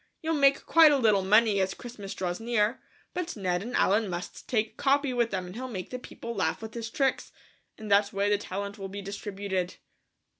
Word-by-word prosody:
You'll 325 Hz, +1 st, 0 dB
make 275 Hz, -2 st, +3 dB
quite 325 Hz, -2 st, +7 dB
a 285 Hz, -, +4 dB
little 215 Hz, -6 st, +4 dB
money 210 Hz, +1 st, +4 dB
as 190 Hz, 0 st, 0 dB
Christmas 215 Hz, -5 st, -8 dB
draws 180 Hz, -1 st, -3 dB
near, 230 Hz, +1 st, +1 dB, 0.3 s
but 355 Hz, -1 st, -3 dB
Ned 180 Hz, -4 st, -1 dB
and 240 Hz, +4 st, -5 dB
Allen 210 Hz, +1 st, +3 dB
must 175 Hz, +1 st, -6 dB
take 220 Hz, -3 st, 0 dB
Capi 280 Hz, -1 st, +2 dB
with 240 Hz, -2 st, +1 dB
them 185 Hz, -3 st, -3 dB
and 180 Hz, -, -9 dB
he'll 260 Hz, +2 st, -5 dB
make 190 Hz, -8 st, -6 dB
the 250 Hz, -, -4 dB
people 235 Hz, -1 st, -7 dB
laugh 160 Hz, -6 st, 0 dB
with 220 Hz, -1 st, -8 dB
his 230 Hz, -1 st, -5 dB
tricks; 270 Hz, +2 st, 0 dB, 0.5 s
in 220 Hz, -, -8 dB
that 200 Hz, 0 st, +4 dB
way 200 Hz, -1 st, 0 dB
the 205 Hz, 0 st, +2 dB
talent 200 Hz, +1 st, -5 dB
will 195 Hz, 0 st, -5 dB
be 200 Hz, +1 st, -7 dB
distributed." 195 Hz, -2 st, -3 dB
210 Hz, 210 wpm, -28 LUFS, 195-245 Hz, 0.5 s, quite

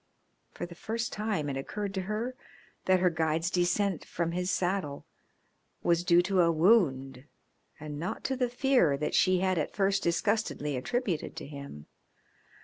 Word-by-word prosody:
For -, -, -6 dB
the 175 Hz, -, -10 dB
first 225 Hz, +6 st, -4 dB
time 210 Hz, -8 st, -1 dB
it 140 Hz, -, -2 dB
occurred 195 Hz, +8 st, -4 dB
to 190 Hz, -, -2 dB
her 215 Hz, +6 st, -3 dB, 0.5 s
that 185 Hz, -1 st, +3 dB
her 180 Hz, -1 st, +4 dB
guide's 160 Hz, +2 st, 0 dB
descent 180 Hz, +1 st, +1 dB
from 170 Hz, -1 st, -2 dB
his 180 Hz, +1 st, -2 dB
saddle 180 Hz, -6 st, -1 dB, 0.8 s
was 170 Hz, 0 st, +2 dB
due 175 Hz, 0 st, +5 dB
to 190 Hz, 0 st, +2 dB
a 170 Hz, -1 st, +4 dB
wound 140 Hz, -, +2 dB, 0.5 s
and 150 Hz, -1 st, -6 dB
not 175 Hz, +4 st, -4 dB
to 265 Hz, -, -1 dB
the 250 Hz, -1 st, 0 dB
fear 245 Hz, -, +3 dB
that 150 Hz, -, -2 dB
she 185 Hz, -1 st, +3 dB
had 185 Hz, -2 st, +1 dB
at 150 Hz, -, -3 dB
first 195 Hz, -1 st, +2 dB
disgustedly 170 Hz, -5 st, 0 dB
attributed 180 Hz, -, -2 dB
to -, -, -6 dB
him. 140 Hz, -, -9 dB
180 Hz, 160 wpm, -29 LUFS, 155-205 Hz, 0.8 s, due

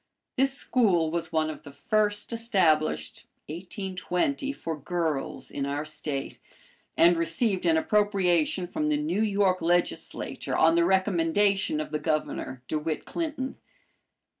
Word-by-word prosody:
This 270 Hz, +1 st, +2 dB
school 195 Hz, -12 st, +2 dB
was 170 Hz, 0 st, -3 dB
one 155 Hz, -1 st, +1 dB
of 155 Hz, -, -10 dB
the -, -, -11 dB
first 210 Hz, +7 st, 0 dB
established 160 Hz, -, +1 dB, 0.2 s
(1820) 185 Hz, -, -2 dB
for 165 Hz, -, -5 dB
girls 160 Hz, -1 st, -3 dB
in 140 Hz, -, -3 dB
our 145 Hz, +2 st, -2 dB
State, 150 Hz, -2 st, -5 dB, 0.6 s
and 175 Hz, +1 st, +6 dB
received 175 Hz, +3 st, 0 dB
an 160 Hz, -1 st, +4 dB
appropriation 185 Hz, -3 st, +2 dB
from 305 Hz, -, -2 dB
the 300 Hz, -1 st, +2 dB
New 300 Hz, -7 st, -1 dB
York 200 Hz, -4 st, +2 dB
legislature 175 Hz, +1 st, -1 dB
on 165 Hz, +1 st, +5 dB
the 170 Hz, 0 st, +3 dB
recommendation 190 Hz, -1 st, +2 dB
of 155 Hz, -, -4 dB
the 150 Hz, -, -1 dB
Governor, 155 Hz, -5 st, -2 dB
De 155 Hz, -, -1 dB
Witt 155 Hz, 0 st, -3 dB
Clinton. 305 Hz, -5 st, -4 dB
175 Hz, 135 wpm, -27 LUFS, 160-205 Hz, 0.6 s, and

